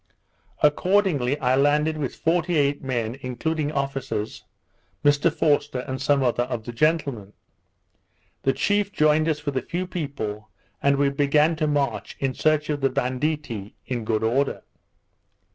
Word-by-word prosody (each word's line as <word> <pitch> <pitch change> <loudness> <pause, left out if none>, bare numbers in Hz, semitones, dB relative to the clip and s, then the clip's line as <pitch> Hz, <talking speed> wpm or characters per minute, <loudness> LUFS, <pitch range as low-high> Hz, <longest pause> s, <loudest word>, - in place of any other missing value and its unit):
Accordingly 150 -4 +2
I 125 0 +3
landed 150 +3 +2
with 140 -4 -3
forty 170 +1 +1
eight 145 -1 +1
men, 120 -1 -2
including 150 +4 -2
officers, 135 -7 -3 0.6
Mr 145 +3 +4
Forster, 145 -4 +1
and 130 0 -5
some 140 0 +2
other 120 -1 +1
of 120 -3 -4
the 120 - -5
gentlemen. 135 -7 0 1.1
The 135 - +2
chief 205 +6 +1
joined 155 -1 +3
us 150 -1 -2
with 140 -2 -1
a - - +1
few 175 +2 -3
people, 125 - -5 0.3
and 140 0 +3
we 140 0 +3
began 150 +3 +3
to 155 -1 0
march, 145 -2 -1
in 135 -1 -1
search 155 +1 +1
of 145 -1 -2
the 135 - +3
banditti, 130 -4 -2
in 120 -3 -3
good 110 0 0
order. 135 +5 0
140 Hz, 145 wpm, -24 LUFS, 125-155 Hz, 1.1 s, Mr